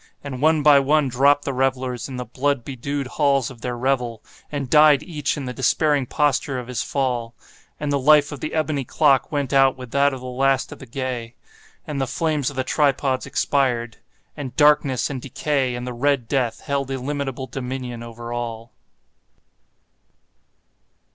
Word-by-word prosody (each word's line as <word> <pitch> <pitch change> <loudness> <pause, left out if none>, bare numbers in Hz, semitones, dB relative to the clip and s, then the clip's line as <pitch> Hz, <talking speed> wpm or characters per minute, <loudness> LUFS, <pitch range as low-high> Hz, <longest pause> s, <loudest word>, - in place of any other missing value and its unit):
And 135 -3 -6
one 155 0 +3
by 145 -1 +7
one 145 0 +2
dropped 140 +3 +3
the 140 - -2
revellers 130 -1 -1
in 130 - -6
the 125 - -4
blood 135 +1 -1
bedewed 140 +1 -4
halls 140 -1 +1
of 120 -3 -14
their 120 0 -3
revel, 125 -3 -1 0.3
and 140 -3 -3
died 150 +1 +6
each 150 -5 -2
in 140 - -4
the 125 - -4
despairing 140 +1 +1
posture 140 -1 0
of 125 -1 -6
his 125 -3 -2
fall. 125 -4 -2 0.4
And 150 -1 -2
the 140 - +1
life 145 +1 +5
of 145 - -7
the 155 - -4
ebony 155 -3 0
clock 135 +1 +2
went 145 -3 -2
out 135 -1 +4
with 125 -2 -9
that 140 +1 +3
of 135 - -6
the 125 - -10
last 135 +1 +1
of - - -9
the 135 - -11
gay. 120 -2 -4 0.5
And 145 -3 -3
the 135 - 0
flames 155 -2 0
of 145 - -10
the 130 - 0
tripods 135 -1 +1
expired. 120 -5 0 0.4
And 130 -5 -6
Darkness 145 -3 +3
and 130 -3 -5
Decay 135 -1 -1
and 120 0 -5
the 125 - -4
Red 130 -1 0
Death 125 -4 -1
held 140 -1 -2
illimitable 135 0 -3
dominion 125 -1 -5
over 120 0 -7
all. 115 -1 -5
135 Hz, 175 wpm, -22 LUFS, 125-145 Hz, 0.5 s, by